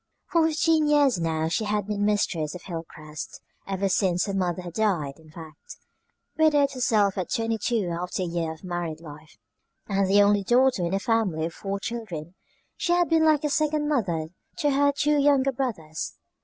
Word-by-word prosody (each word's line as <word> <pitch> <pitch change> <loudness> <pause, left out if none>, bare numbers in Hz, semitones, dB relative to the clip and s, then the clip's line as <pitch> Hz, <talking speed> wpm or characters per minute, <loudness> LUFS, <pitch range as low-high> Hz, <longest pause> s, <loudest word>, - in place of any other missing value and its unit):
For 330 -2 +4
fifteen 315 0 +2
years 285 -8 +3
now 160 -1 0
she 190 +7 -1
had 210 -1 -1
been 205 0 -2
mistress 180 -7 0
of 180 - -9
Hilcrest, 155 -3 -8 0.3
ever 195 0 -1
since 180 -2 +1
her 200 - -3
mother 180 -2 -1
had 175 -2 -8
died, 170 -10 -1
in 160 -1 -18
fact. 155 -1 -12 0.6
Widowed 295 -3 +4
herself 215 -7 +1
at 180 - -3
twenty 225 -2 -1
two 215 -2 0
after 180 +2 -3
a - - -1
year 170 -2 -2
of 160 +2 -11
married 175 -3 -4
life, 150 -6 -13 0.5
and 195 -1 +1
the 205 +1 +6
only 205 0 +3
daughter 245 -2 +3
in 170 +3 0
a - - 0
family 195 -8 0
of 165 - -5
four 200 0 -4
children, 190 -8 -6 0.4
she 345 - 0
had 350 -1 +2
been 325 -1 +4
like 310 -1 +3
a 300 - +1
second 305 -1 +1
mother 175 - -1 0.3
to 290 - +1
her 285 +1 +3
two 295 +1 +1
younger 275 -1 +3
brothers. 210 - -4
200 Hz, 185 wpm, -25 LUFS, 170-270 Hz, 0.6 s, the